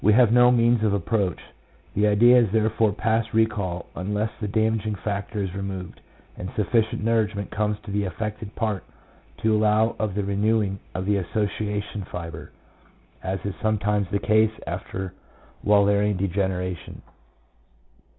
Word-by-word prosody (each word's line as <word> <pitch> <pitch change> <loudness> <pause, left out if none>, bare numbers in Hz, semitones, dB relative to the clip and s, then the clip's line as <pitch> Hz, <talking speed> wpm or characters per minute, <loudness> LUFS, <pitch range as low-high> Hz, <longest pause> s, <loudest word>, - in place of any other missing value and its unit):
have 120 -2 +5
no 125 0 +7
means 120 -1 +4
of 105 -2 +2
approach; 100 -1 0 0.5
the 105 +1 +2
idea 120 +4 +6
is 115 -5 +2
therefore 110 0 +2
past 110 +2 0
recall 100 -6 0
unless 105 +4 -2
the 105 - -1
damaging 110 0 0
factor 100 +1 -3
is 95 -2 -4
removed, 95 -2 -6 0.4
and 90 - -5
sufficient 110 +1 +1
nourishment 110 -3 0
comes 105 0 0
to 105 - -7
the 100 +1 0
affected 105 +2 -5
part 110 -4 -1 0.5
to 110 -1 +2
allow 110 +1 +3
of 105 -3 -1
the 105 - 0
renewing 100 0 +1 0.2
of 95 - -2
the 105 0 +2
association 105 +1 -2
fibre, 85 -3 -7 0.7
as 95 +1 -2
is 100 - -2
sometimes 105 -2 +1
the 100 - +1
case 110 +1 +3
after 95 +2 -5 0.5
Wallerian 100 0 +3
degeneration. 90 -2 -2
105 Hz, 140 wpm, -24 LUFS, 100-110 Hz, 0.7 s, no